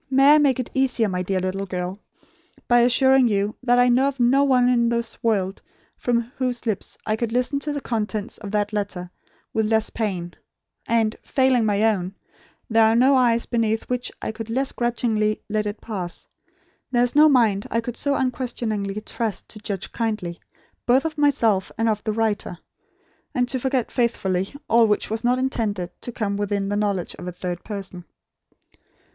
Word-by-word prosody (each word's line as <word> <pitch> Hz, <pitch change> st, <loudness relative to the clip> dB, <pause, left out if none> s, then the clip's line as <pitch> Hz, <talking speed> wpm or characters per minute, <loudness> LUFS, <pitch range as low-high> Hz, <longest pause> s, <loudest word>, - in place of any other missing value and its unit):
May 275 Hz, +2 st, +6 dB
I -, -, +7 dB
make 275 Hz, -4 st, +3 dB
it 255 Hz, -, -4 dB
easier, 255 Hz, -4 st, +2 dB
my 180 Hz, -2 st, -2 dB
dear 185 Hz, +1 st, -1 dB
little 190 Hz, +2 st, -3 dB
girl, 180 Hz, +1 st, -4 dB, 0.7 s
by 240 Hz, 0 st, +5 dB
assuring 260 Hz, +2 st, +4 dB
you 205 Hz, 0 st, 0 dB
that 245 Hz, -1 st, +3 dB
I 245 Hz, 0 st, +5 dB
know 250 Hz, +3 st, +4 dB
of 280 Hz, -1 st, -3 dB
no 255 Hz, +3 st, +4 dB
one 255 Hz, -3 st, +4 dB
in 235 Hz, -2 st, +3 dB
this 235 Hz, -1 st, -2 dB
world 195 Hz, -4 st, 0 dB, 0.3 s
from 240 Hz, -1 st, 0 dB, 0.2 s
whose 250 Hz, -2 st, -2 dB
lips 215 Hz, -4 st, -2 dB
I 215 Hz, -, +1 dB
could 225 Hz, 0 st, -2 dB
listen 250 Hz, +4 st, +1 dB
to 295 Hz, +1 st, -3 dB
the 290 Hz, -1 st, -3 dB
contents 215 Hz, -2 st, -3 dB
of 205 Hz, -, -7 dB
that 205 Hz, +1 st, -1 dB
letter 190 Hz, -4 st, -3 dB, 0.4 s
with 220 Hz, -1 st, +1 dB
less 220 Hz, 0 st, +1 dB
pain; 185 Hz, -6 st, -3 dB, 0.5 s
and, 225 Hz, -1 st, +2 dB
failing 260 Hz, -4 st, +2 dB
my 205 Hz, 0 st, +1 dB
own, 195 Hz, -4 st, +1 dB, 0.5 s
there 225 Hz, 0 st, +3 dB
are 220 Hz, +1 st, +4 dB
no 260 Hz, +4 st, +5 dB
eyes 235 Hz, -2 st, +3 dB
beneath 225 Hz, -2 st, 0 dB
which 250 Hz, 0 st, -2 dB
I -, -, -2 dB
could 225 Hz, 0 st, -7 dB
less 265 Hz, +4 st, 0 dB
grudgingly 225 Hz, -3 st, 0 dB
let 215 Hz, 0 st, -1 dB
it 205 Hz, +1 st, -5 dB
pass, 185 Hz, -6 st, -5 dB, 0.6 s
there 245 Hz, -1 st, +2 dB
is 245 Hz, -, 0 dB
no 305 Hz, +1 st, +7 dB
mind 225 Hz, -7 st, +3 dB
I 230 Hz, -, +1 dB
could 235 Hz, +1 st, -5 dB
so 285 Hz, +1 st, 0 dB
unquestioningly 230 Hz, -6 st, -2 dB
trust, 225 Hz, -1 st, -4 dB
to 215 Hz, -, -9 dB
judge 200 Hz, -3 st, -4 dB
kindly, 215 Hz, -7 st, -3 dB, 0.5 s
both 260 Hz, +4 st, +4 dB
of 315 Hz, -1 st, -2 dB
myself 230 Hz, -10 st, +2 dB
and 225 Hz, +1 st, +1 dB
of 215 Hz, -1 st, 0 dB
the 215 Hz, -, -1 dB
writer; 215 Hz, -5 st, -1 dB, 0.8 s
and 245 Hz, -1 st, +2 dB
to 260 Hz, -, +1 dB
forget 260 Hz, -2 st, -1 dB
faithfully, 195 Hz, -6 st, 0 dB, 0.2 s
all 230 Hz, 0 st, +5 dB
which 210 Hz, 0 st, 0 dB
was 220 Hz, 0 st, -2 dB
not 245 Hz, +1 st, +3 dB
intended 215 Hz, -9 st, -2 dB
to 245 Hz, -, -5 dB
come 205 Hz, -4 st, -2 dB
within 200 Hz, -1 st, -1 dB
the 205 Hz, -, -1 dB
knowledge 200 Hz, -4 st, -1 dB
of 180 Hz, -, -7 dB
a -, -, -3 dB
third 180 Hz, 0 st, -5 dB
person." 195 Hz, -4 st, -6 dB
225 Hz, 185 wpm, -23 LUFS, 205-245 Hz, 0.8 s, I